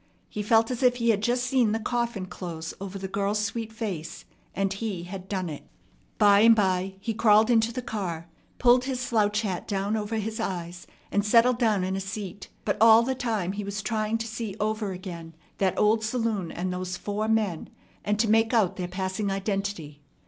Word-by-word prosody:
He 210 - -4
felt 225 +3 +3
as 250 - -3
if 250 -1 +4
he 235 -1 0
had 205 -2 0
just 245 +3 +1
seen 250 -4 +2
the 225 - 0
coffin 235 -3 -2
close 165 -3 -6
over 195 0 -5
the 190 0 -5
girl's 200 +2 -1
sweet 225 +1 -4
face, 200 -8 -5 0.3
and 195 0 0
he 195 -4 -4
had 185 +1 -8
done 185 -3 -2
it. 150 -3 -8 0.5
By 205 -2 +6
and 230 +2 +7
by 190 -2 0
he 225 +3 -3
crawled 215 +1 +4
into 225 0 +3
the 250 +1 -5
car, 175 -8 -4 0.3
pulled 245 +1 +4
his 260 -2 -2
slouch 215 -4 +1
hat 190 -5 -3
down 200 +1 -1
over 215 +1 -2
his 220 0 -3
eyes, 175 -1 -4 0.2
and 205 - +2
settled 235 +3 +4
down 215 -6 +2
in 190 +1 -1
a 195 - -2
seat; 200 -1 -6 0.2
but 205 - 0
all 225 0 +8
the 260 +2 0
time 220 -8 -2
he 205 +1 -4
was 200 +1 -4
trying 215 0 0
to 225 - -4
see 225 -3 -5
over 215 -1 -1
again 170 -3 -8 0.2
that 190 -2 +1
old 220 +1 +3
saloon 215 -6 -1
and 180 +1 -3
those 180 0 -4
four 210 +3 -3
men, 215 -7 0 0.3
and 210 0 0
to 225 +1 +2
make 225 +2 +3
out 210 -6 +2
their 180 -1 -3
passing 190 +2 -2
identity. 195 -6 -3
210 Hz, 200 wpm, -26 LUFS, 190-225 Hz, 0.5 s, all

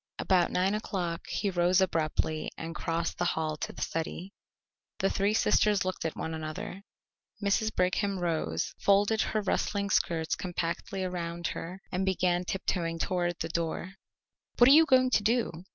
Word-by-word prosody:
About 180 -2 +2
nine 185 +2 +1
o'clock 185 -6 -3
he 200 -1 -1
rose 175 +1 +3
abruptly 160 -3 0
and 165 0 -5
crossed 165 0 -2
the - - +1
hall 155 -1 -1
to - - -4
the - - -4
study. 170 +4 -4 0.6
The 195 - +1
three 200 +2 +1
sisters 210 -3 +3
looked 185 -3 -3
at 160 - -2
one 160 - -4
another. 160 +4 -5 0.6
Mrs. 205 +2 +1
Brigham 195 +2 +1
rose, 160 - -1
folded 205 +2 +3
her 215 - 0
rustling 200 +1 -1
skirts 160 -3 +1
compactly 180 +2 -3
around 170 -2 -4
her, 185 +3 -7
and 185 +1 -1
began 180 -1 +1
tiptoeing 170 -3 -2
toward 175 0 -1
the 165 - -2
door. 170 +2 -3 0.6
"What 240 - +7
are 270 - +9
you 320 +1 +7
going 255 -2 +4
to 215 - +4
do?" 210 -6 0
180 Hz, 160 wpm, -29 LUFS, 165-200 Hz, 0.6 s, are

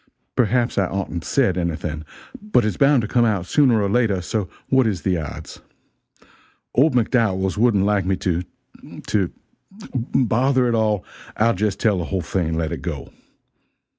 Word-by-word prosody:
Perhaps 120 -1 +1
I 95 - +2
oughtn't 90 -4 -4
said 105 -10 +1
anything, 80 -2 -3 0.4
but 210 - +2
its 105 -4 -1
bound 140 -1 +4
to - - -2
come 120 +2 +2
out 105 -6 +1
sooner 125 0 +3
or - - +1
later, 105 -2 +1
so 95 +2 -3 0.2
what 130 -3 +3
is 95 -5 -2
the 95 -2 +1
odds? 75 -3 -8 1.1
Old 135 +1 +3
McDowells 105 -6 +1
wouldn't 105 -3 +3
like 100 -3 +1
me 95 - +2
to 90 -2 -1 0.6
to 95 -5 0 0.6
bother 130 +1 +1
it 120 - +1
all, 110 -3 +1 0.3
I'll 115 +2 +3
jest 100 +1 -1
tell 105 -5 +2
the 85 - -3
whole 95 -3 -2
thing 85 0 -1
and 80 0 -2
let 80 -1 -1
it 80 -5 -4
go. - - -6
105 Hz, 165 wpm, -21 LUFS, 90-120 Hz, 1.1 s, bound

